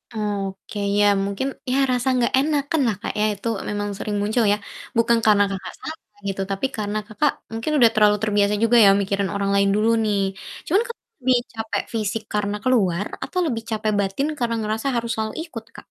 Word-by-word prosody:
Oke. 200 Hz, -1 st, -4 dB, 0.2 s
Ya 205 Hz, -, +5 dB, 0.2 s
mungkin, 200 Hz, +7 st, -2 dB, 0.2 s
ya 265 Hz, -, +2 dB
rasa 250 Hz, +1 st, 0 dB
nggak 235 Hz, -, +1 dB
enakanlah, 280 Hz, -, +1 dB
Kak, -, -, -3 dB
ya, 210 Hz, -, +3 dB
itu 200 Hz, +3 st, -6 dB, 0.2 s
memang 205 Hz, 0 st, -2 dB
sering 205 Hz, +1 st, -3 dB
muncul 220 Hz, +3 st, +1 dB
ya, -, -, 0 dB, 0.4 s
bukan 230 Hz, 0 st, +4 dB
karena 210 Hz, -2 st, +6 dB
Kakak 190 Hz, -1 st, -6 dB
salah 315 Hz, -, -6 dB, 0.3 s
gitu, 195 Hz, 0 st, -2 dB
tapi 195 Hz, +5 st, -1 dB
karena 210 Hz, 0 st, -2 dB
Kakak 270 Hz, +6 st, +1 dB, 0.2 s
mungkin 225 Hz, +7 st, -2 dB
udah 235 Hz, -3 st, +7 dB
terlalu 210 Hz, -1 st, +5 dB
terbiasa 205 Hz, -1 st, +2 dB
juga 235 Hz, +1 st, +5 dB
ya -, -, +8 dB
mikirin 195 Hz, 0 st, -1 dB
orang 200 Hz, 0 st, 0 dB
lain 200 Hz, 0 st, +3 dB
dulu 215 Hz, +2 st, +2 dB
nih. 210 Hz, -2 st, +1 dB, 0.5 s
Cuman 390 Hz, +7 st, +3 dB
Kakak 470 Hz, -, -8 dB, 0.2 s
lebih 255 Hz, -1 st, +3 dB, 0.2 s
capek 225 Hz, -1 st, -2 dB
fisik 215 Hz, 0 st, -1 dB
karena 205 Hz, -1 st, 0 dB
keluar, 200 Hz, -8 st, +2 dB, 0.2 s
atau 365 Hz, +7 st, -3 dB
lebih 230 Hz, -6 st, -2 dB
capek 215 Hz, -1 st, 0 dB
batin 200 Hz, +9 st, 0 dB
karena 235 Hz, -2 st, 0 dB
ngerasa 215 Hz, +4 st, -2 dB
harus 235 Hz, 0 st, -1 dB
selalu 220 Hz, 0 st, -2 dB
ikut, 225 Hz, -9 st, -9 dB
Kak? -, -, -11 dB
215 Hz, 190 wpm, -22 LUFS, 205-240 Hz, 0.5 s, ya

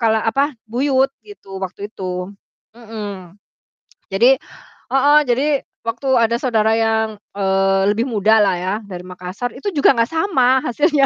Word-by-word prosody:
kalo, 220 Hz, -1 st, +2 dB
apa, 275 Hz, +6 st, +1 dB, 0.2 s
buyut 265 Hz, +3 st, +1 dB
gitu 195 Hz, -, -11 dB
waktu 200 Hz, +2 st, -5 dB
itu, 180 Hz, 0 st, -5 dB, 0.5 s
mhm. 205 Hz, -6 st, -8 dB, 0.8 s
Jadi 245 Hz, +7 st, +5 dB, 0.5 s
heeh, 285 Hz, +3 st, +5 dB
jadi 250 Hz, +4 st, +2 dB, 0.4 s
waktu 230 Hz, +4 st, -4 dB
ada 230 Hz, 0 st, +2 dB
saudara 220 Hz, -4 st, +2 dB
yang, 220 Hz, -1 st, 0 dB, 0.2 s
eee, 195 Hz, 0 st, +2 dB
lebih 225 Hz, +3 st, -1 dB
muda 220 Hz, -1 st, +3 dB
lah 195 Hz, -2 st, +2 dB
ya 185 Hz, +2 st, -2 dB, 0.2 s
dari 180 Hz, -2 st, -7 dB
Makassar, 185 Hz, +6 st, -6 dB
itu 280 Hz, -, -3 dB
juga 285 Hz, -2 st, +4 dB
gak 230 Hz, 0 st, +2 dB
sama 265 Hz, -7 st, +2 dB
hasilnya. 290 Hz, +3 st, +2 dB
225 Hz, 140 wpm, -19 LUFS, 195-265 Hz, 0.8 s, Jadi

